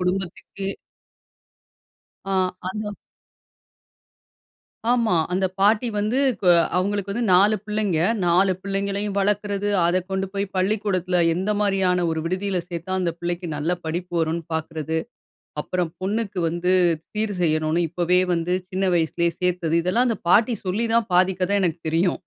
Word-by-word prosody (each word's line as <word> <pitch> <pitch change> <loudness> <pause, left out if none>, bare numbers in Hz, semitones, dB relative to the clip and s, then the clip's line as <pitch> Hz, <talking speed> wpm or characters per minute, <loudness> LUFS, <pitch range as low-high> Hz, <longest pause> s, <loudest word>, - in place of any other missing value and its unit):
குடும்பத்துக்கே 190 +1 -3 1.6
ஆ, 195 - -3 0.4
அது 210 +1 -4 2.0
ஆமா. 230 -8 +2 0.2
அந்த 190 +1 +1
பாட்டி 210 +4 +3
வந்து 215 +5 0 0.2
கோ 190 - 0 0.3
அவங்களுக்கு 200 +1 -1
வந்து 235 +4 -1
4 200 +4 +5
பிள்ளைங்க, 210 -5 0 0.3
4 185 +2 +4
பிள்ளைங்களையும் 200 +1 -2
வளக்குறது 205 0 0 0.2
அத 175 +2 +2
கொண்டு 190 0 -1
போயி 200 0 -1
பள்ளிக்கூடத்துல 185 -2 +1
எந்த 190 +4 -1
மாரியான 190 -3 +2
ஒரு 160 0 -1
விடுதியில 185 +2 -1
சேத்தா, 170 +1 -5
அந்த 175 -2 0
பிள்ளைக்கு 175 +1 -3
நல்ல 150 +4 -1
படிப்பு 175 +3 -4
வருன்னு 165 +1 -1
பாக்குறது, 160 0 -3 0.7
அப்பறம் 175 -1 -2
பொண்ணுக்கு 200 0 -2
வந்து 175 +2 0 0.4
சீர் 215 -1 -1
செய்யணும்னு 155 0 +1
இப்பவே 180 +2 +2
வந்து 170 +2 0 0.2
சின்ன 190 +1 -1
வயசுலேயே 170 +1 +1
சேத்தது, 180 -3 0
இதெல்லாம் 230 +8 +2
அந்த 225 -4 -1
பாட்டி 225 +5 +5
சொல்லி 200 +5 0
தான் 230 -2 +2
பாதிக் 185 +1 +3
கத 200 +2 +2
எனக்கு 170 -2 0
தெரியும். 170 +3 +1
185 Hz, 130 wpm, -23 LUFS, 175-205 Hz, 2.0 s, 4